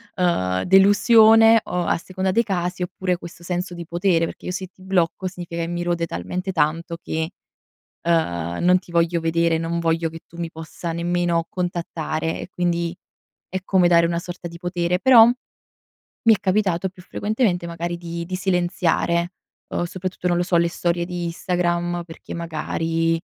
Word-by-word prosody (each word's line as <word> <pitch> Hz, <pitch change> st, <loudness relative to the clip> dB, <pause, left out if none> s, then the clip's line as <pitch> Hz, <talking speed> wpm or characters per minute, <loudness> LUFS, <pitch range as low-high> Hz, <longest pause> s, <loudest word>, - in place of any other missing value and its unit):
ehm, 95 Hz, -, +1 dB
delusione 220 Hz, +3 st, +6 dB
o 180 Hz, -1 st, -2 dB
a -, -, +1 dB
seconda 185 Hz, +2 st, -2 dB
dei 230 Hz, +4 st, +3 dB
casi 180 Hz, -2 st, -2 dB
oppure 180 Hz, 0 st, -2 dB
questo 170 Hz, 0 st, -11 dB
senso 180 Hz, +1 st, -3 dB
di 170 Hz, -1 st, -7 dB
potere, 170 Hz, 0 st, +1 dB
perché -, -, -9 dB
io -, -, -2 dB
se 185 Hz, +1 st, -4 dB
ti 185 Hz, -, -25 dB
blocco 185 Hz, 0 st, 0 dB
significa 175 Hz, -2 st, -6 dB
che -, -, -3 dB
mi 175 Hz, 0 st, -3 dB
rode 170 Hz, -1 st, 0 dB
talmente 180 Hz, -, -4 dB
tanto 165 Hz, +2 st, 0 dB
che, 160 Hz, +1 st, -2 dB, 0.7 s
ehm, 85 Hz, -, 0 dB
non 180 Hz, +1 st, +5 dB
ti 175 Hz, -, -16 dB
voglio 170 Hz, 0 st, +2 dB
vedere, 165 Hz, 0 st, +2 dB
non 165 Hz, +1 st, -2 dB
voglio 165 Hz, 0 st, 0 dB
che 165 Hz, 0 st, -10 dB
tu 170 Hz, -, -15 dB
mi 165 Hz, -1 st, -3 dB
possa 160 Hz, +1 st, -6 dB
nemmeno 170 Hz, 0 st, 0 dB
contattare 165 Hz, -3 st, -3 dB
e -, -, -7 dB
quindi 170 Hz, -1 st, -1 dB, 0.5 s
è 185 Hz, -, -2 dB
come 185 Hz, -2 st, +3 dB
dare 170 Hz, -1 st, +5 dB
una 170 Hz, 0 st, -1 dB
sorta 175 Hz, 0 st, -7 dB
di 170 Hz, 0 st, -10 dB
potere. 175 Hz, 0 st, -1 dB
Però 240 Hz, -3 st, +8 dB
mi 245 Hz, +2 st, -3 dB, 0.7 s
è -, -, -8 dB
capitato 190 Hz, -2 st, +1 dB
più 180 Hz, 0 st, -16 dB
frequentemente 205 Hz, -4 st, -1 dB
magari 170 Hz, +1 st, -4 dB
di 170 Hz, 0 st, -5 dB
di 185 Hz, +1 st, -4 dB
silenziare, 175 Hz, -1 st, 0 dB, 0.4 s
uhm, -, -, -1 dB
soprattutto, 185 Hz, 0 st, -4 dB
non 175 Hz, -, +2 dB
lo 175 Hz, -, +2 dB
so, 175 Hz, -1 st, +2 dB
le 170 Hz, 0 st, +3 dB
storie 170 Hz, 0 st, -1 dB
di 175 Hz, -1 st, -4 dB
Instagram 175 Hz, 0 st, -1 dB
perché 165 Hz, -, -10 dB
magari, 165 Hz, 0 st, -1 dB
175 Hz, 170 wpm, -22 LUFS, 170-180 Hz, 0.7 s, Però